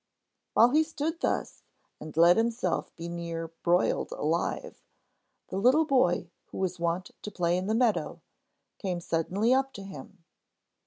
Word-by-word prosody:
While 235 - +7
he 305 +3 +5
stood 320 +1 -3
thus, - - -2 0.4
and 155 0 -9
let 170 +2 +7
himself 235 +1 0
be 170 - -6
nearly 170 -1 -5
broiled 175 +1 +1
alive, 165 +3 -2 0.7
the 190 - -4
little 260 +10 +4
boy 180 - +2 0.2
who - - -10
was 185 -2 -2
wont 170 +2 -1
to - - -5
play 175 -3 0
in 185 +1 -2
the 220 - +1
meadow 235 -2 +1 0.6
came 185 -3 -2
suddenly 180 +8 +1
up 270 0 +1
to 200 - -8
him. 195 -1 -11
185 Hz, 150 wpm, -28 LUFS, 170-240 Hz, 0.7 s, While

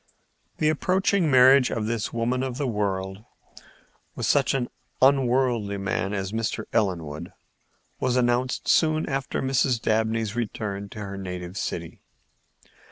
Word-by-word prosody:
The 155 - +2
approaching 185 +2 +1
marriage 130 0 +6
of 110 - -2
this 115 -1 -2
woman 120 +2 -1
of 130 -2 -3
the 145 - -1
world 100 -3 -2 0.9
with - - -2
such - - +2
an 125 -2 -1 0.3
unworldly 125 -6 +2
man 100 0 -2
as 95 -1 -3
Mr. 110 0 -2
Ellenwood 85 -9 -1 0.7
was 125 - 0
announced 125 +1 +1
soon 155 -1 +3
after 135 -2 -2
Mrs. 130 -2 +2
Dabney's 110 0 0
return 105 -3 -4
to 105 - -9
her 100 -1 -6
native 90 -1 -6
city. 85 -5 -5
115 Hz, 130 wpm, -25 LUFS, 100-130 Hz, 0.9 s, marriage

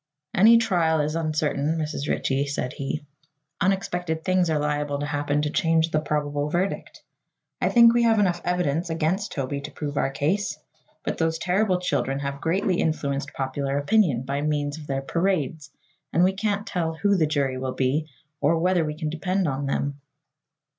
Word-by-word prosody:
"Any 225 +4 +7
trial 175 -8 +2
is 150 +1 0
uncertain, 155 -1 0
Mrs. 155 -2 -3
Ritchie," 140 +1 0
said 135 -2 -3
he. 145 +2 -4 0.6
"Unexpected 175 -4 -1
things 185 -2 +2
are 155 - +2
liable 145 -1 -1
to 145 - -3
happen 145 0 0
to 150 - -1
change 165 -3 +2
the 155 - +2
probable 145 -1 -1
verdict. 180 +5 -2 0.6
I - - +2
think 235 -1 +7
we 240 - +3
have 230 -1 +4
enough 180 -4 +2
evidence 175 -2 0
against 165 +6 -1
Toby 140 0 -3
to - - -6
prove 145 -2 -5
our - - +2
case, 150 +4 -1 0.5
but - - -3
those 165 0 +1
terrible 185 +2 +1
children 135 -6 -1
have 140 0 -4
greatly 185 +2 +1
influenced 140 -3 -1
popular 135 +1 -2
opinion 145 - +2
by 140 +2 -2
means 145 0 -1
of 150 - -10
their 135 -1 -2
parades 160 -3 -1 0.4
and 170 - +3
we 190 +1 +3
can't 205 +1 -1
tell 170 -5 -2
who 200 +4 +2
the 160 -4 +2
jury 140 -4 0
will 130 0 -3
be, 145 +4 0 0.3
or 165 +3 +3
whether 180 0 +2
we 150 -1 -3
can 155 -2 -3
depend 185 +3 0
on 135 0 -2
them." 140 +1 -2
155 Hz, 175 wpm, -25 LUFS, 145-180 Hz, 0.6 s, Any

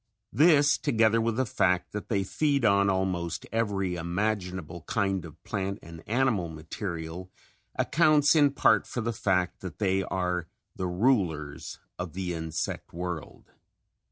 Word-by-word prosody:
This, 150 +1 +5
together 115 -5 +3
with 115 0 0
the 130 +2 +1
fact 90 -5 +1
that 105 - -6
they 100 -4 +1
feed 140 +5 +1
on 100 -1 +4
almost 90 -4 -1
every 100 -5 0
imaginable 90 -1 -2
kind 95 -4 0
of 80 0 -13
plant 100 -2 -3
and 85 0 -10
animal 110 -7 +1
material, 80 +2 -6 0.5
accounts 155 -1 +4
in 145 -2 +6
part - - +3
for 120 - -3
the 115 +1 -2
fact 90 -4 0
that 90 -5 -8
they 95 -2 +1
are 90 -2 -2 0.3
the 95 - -2
rulers 90 - 0 0.2
of 90 -3 -5
the 90 -1 -3
insect 80 -1 -4
world. 85 -4 -6
95 Hz, 140 wpm, -28 LUFS, 85-110 Hz, 0.5 s, in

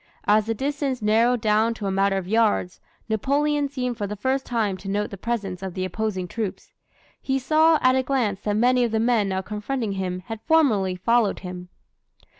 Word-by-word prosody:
As 210 +1 +3
the 225 - -1
distance 275 +1 -2
narrowed 230 +3 +3
down 220 +2 +2
to 210 - -6
a 195 - 0
matter 195 0 +2
of 185 -2 -4
yards, 215 -4 +1 0.3
Napoleon 285 +6 0
seemed 250 -3 -3
for 205 - -2
the 210 - -5
first 260 +6 -1
time 220 -5 0
to 195 +1 -8
note 205 +1 -1
the - - -5
presence 195 -3 -3
of 190 -2 -6
the 185 -1 -2
opposing 190 -1 -3
troops. 215 +1 -5 0.5
He 265 0 0
saw 315 +4 +4
at 255 0 +5
a 260 - +3
glance 250 -7 -1
that 205 -1 -2
many 250 +2 +3
of 240 - +1
the 220 - +1
men 225 -3 +2
now 190 0 -2
confronting 215 +3 -3
him 185 -2 -3
had 225 +3 -7
formerly 225 - +2
followed 230 +3 +1
him. 180 -1 -8
220 Hz, 200 wpm, -24 LUFS, 195-250 Hz, 0.5 s, at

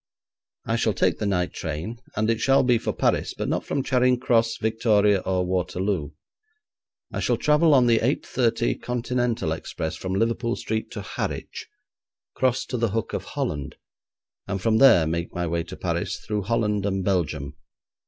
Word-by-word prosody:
I - - 0
shall - - +1
take - - +1
the 105 - -1
night 90 -3 0
train, 80 +9 -5 0.2
and 110 0 +1
it 115 - -1
shall 135 +2 +4
be 125 -2 +3
for - - -2
Paris, - - 0
but - - -3
not - - -1
from 140 - -2
Charing 125 -1 +2
Cross, 115 -3 +2
Victoria, 105 -2 +2
or 95 -1 -1
Waterloo. 90 -2 -1 1.0
I - - -2
shall - - +1
travel 150 0 +4
on 125 -2 +5
the 115 -2 +4
8.30 - - 0
Continental 120 -6 -1
express 80 0 -4
from 95 0 -4
Liverpool 115 +3 0
Street 110 0 -3
to 105 - -5
Harwich, 90 - -5 0.7
cross 130 -1 +1
to 125 - -3
the 115 -1 +1
Hook 110 +2 -3
of - - -3
Holland, 75 0 -4 0.7
and 95 - -2
from 110 +3 +2
there 115 -12 +7
make 85 +2 -3
my 90 0 -1
way 85 0 -1
to 90 +2 -8
Paris 85 -1 -2
through 105 -1 -3
Holland 105 -1 0
and 95 -1 -1
Belgium. 75 -7 -1
105 Hz, 170 wpm, -24 LUFS, 90-120 Hz, 1.0 s, there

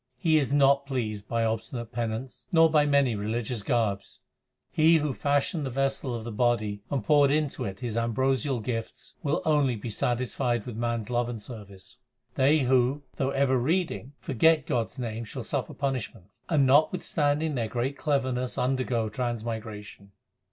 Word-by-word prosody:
He 155 +3 +3
is 140 -2 -1
not 140 -1 +4
pleased 110 -6 -3
by 115 -1 0
obstinate 115 +1 -3
penance 120 +2 -4
nor 165 -1 +5
by 150 -2 +4
many 140 -4 +3
religious 110 +2 -2
garbs. 105 -3 -1 0.5
He 160 +1 +5
who 150 -3 -1
fashioned 145 +4 0
the 135 - -2
vessel 135 -1 -1
of 115 - -5
the 115 - -5
body 105 -3 0
and 135 -6 -1
poured 145 -2 +5
into 150 0 0
it 95 +4 -6
His 120 -3 -3
ambrosial 130 +2 0
gifts, 115 -1 -5
Will 150 +2 -1
only 145 -5 +3
be 110 +2 -6
satisfied 120 0 -1
with 120 - -6
man 115 0 -1
s 110 - -9
love 120 0 0
and 120 -2 -5
service. 105 -4 -10 0.4
They 145 +3 +3
who, 130 +2 +2
though 135 - 0
ever 135 -1 +2
reading, 155 -1 -1
forget 155 +5 +3
God 120 -7 0
s - - -17
name 115 -2 -4
shall 120 +2 -7
suffer 130 -1 -3
punishment, 130 -8 -4 0.2
And 150 -5 +4
notwithstanding 150 +1 +2
their 120 -4 -1
great 125 +4 -2
cleverness 130 -4 -1
undergo 125 -3 0
trans 120 +1 -3
migration. 105 -3 -7
125 Hz, 165 wpm, -27 LUFS, 115-140 Hz, 0.5 s, nor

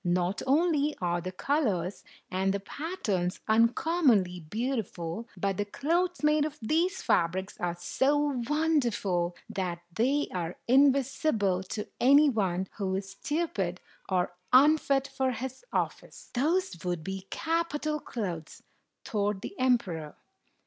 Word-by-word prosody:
Not 180 +2 0
only 300 0 +2
are 175 -1 0
the 185 +2 -4
colors 200 - -1 0.3
and 190 +1 +1
the - - -1
pat 320 - -7
terns 180 -3 0
uncommonly 230 - +3
beautiful, 215 - -3
but 195 0 -1
the 205 - 0
clothes 340 - -1
made 300 0 +4
of 305 0 -3
these 335 - 0
fabrics 185 +2 +1
are 175 -1 -1
so 280 +8 +1
wonderful 235 - +1
that 175 -3 -3
they 265 +9 +1
are 175 -2 -3
invisible 265 -7 +3
to 210 +3 -4
any 285 +4 +6
one 190 -5 0
who 190 -3 -1
is 195 0 -4
stupid 200 - -2 0.3
or 180 -2 +1 0.2
unfit 275 0 +5
for 265 -1 -1
his 260 - -6
office." - - -3
"Those 315 - 0
would 175 -3 -2
be 190 +2 -5
capital 320 -2 -1
clothes!" 180 - -5 0.4
thought 205 -2 -1
the - - -5
emperor. 190 -12 +1
225 Hz, 130 wpm, -29 LUFS, 185-290 Hz, 0.4 s, any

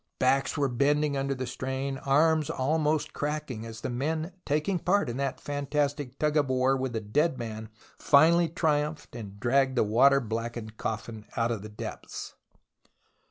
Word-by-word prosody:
Backs 135 +3 +2
were 145 -1 +2
bending 145 +3 +1
under 135 0 -1
the 130 0 -3
strain, 130 +2 -3
arms 155 +2 +3
almost 150 +3 0
cracking 145 -6 -3
as 110 -1 -9
the - - -3
men 155 +7 -2 0.2
taking 155 +6 +1
part 195 +2 +2
in 120 - -5
that 140 -1 -2
fantastic 145 -1 -2
tug 150 0 +1
of 145 -3 +2
war 130 +1 +3
with 130 -2 -3
a - - +1
dead 135 +8 +1
man 110 -2 -6 0.3
finally 165 +4 +5
triumphed 150 -3 -1
and 100 -4 -8
dragged 130 +3 +2
the - - +5
water 130 +6 +5
blackened 115 -1 -4
coffin 110 0 -5
out 115 0 +1
of 115 -4 -2
the 105 - -8
depths. 105 - -7
135 Hz, 160 wpm, -28 LUFS, 120-150 Hz, 0.3 s, finally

